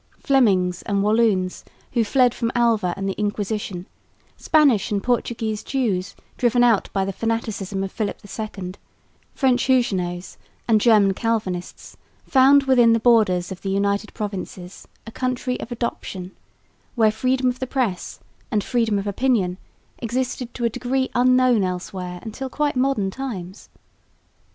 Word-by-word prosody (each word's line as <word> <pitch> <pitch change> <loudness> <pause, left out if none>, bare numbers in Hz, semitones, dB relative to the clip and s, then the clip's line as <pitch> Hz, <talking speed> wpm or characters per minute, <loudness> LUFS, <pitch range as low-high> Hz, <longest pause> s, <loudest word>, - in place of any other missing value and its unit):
Flemings 195 - +2
and 200 -1 -1
Walloons, 210 -4 +1 0.3
who 235 -2 +2
fled 245 +2 +3
from 230 0 -2
Alva 225 -7 +2
and 195 0 -3
the 195 - -1
Inquisition, 205 -3 -3 0.5
Spanish 280 -11 +3
and 200 -2 -1
Portuguese 230 -3 -1
Jews 215 -9 -2 0.2
driven 245 -1 +3
out 230 -4 +3
by 195 -1 0
the 195 - -3
fanaticism 215 -3 -2
of 195 - -4
Philip 215 -2 -3
II, 195 -2 -6 0.6
French 255 -3 +2
Huguenots 190 -9 0 0.3
and 220 -3 +4
German 210 -4 +5
Calvinists, 200 -5 -3 0.3
found 275 +1 +5
within 245 -4 +5
the 230 - +2
borders 215 -7 +3
of 185 - -7
the 195 - -3
United 200 +2 0
Provinces 195 -3 -6 0.2
a 225 - -9
country 255 +1 -2
of 245 - -7
adoption, 195 -6 -4 0.6
where 220 -3 +4
freedom 255 +4 0
of 250 +1 -4
the 260 - -3
press 240 -9 -2 0.3
and 210 -5 0
freedom 230 -4 +1
of 200 - -3
opinion 200 -4 0 0.4
existed 250 +1 -3
to 240 - -2
a - - +3
degree 255 +3 -1
unknown 255 -3 +4
elsewhere 180 0 -4
until 245 +4 -6
quite 295 +1 -1
modern 255 -7 +1
times. 195 -7 -7
220 Hz, 140 wpm, -22 LUFS, 195-250 Hz, 0.6 s, German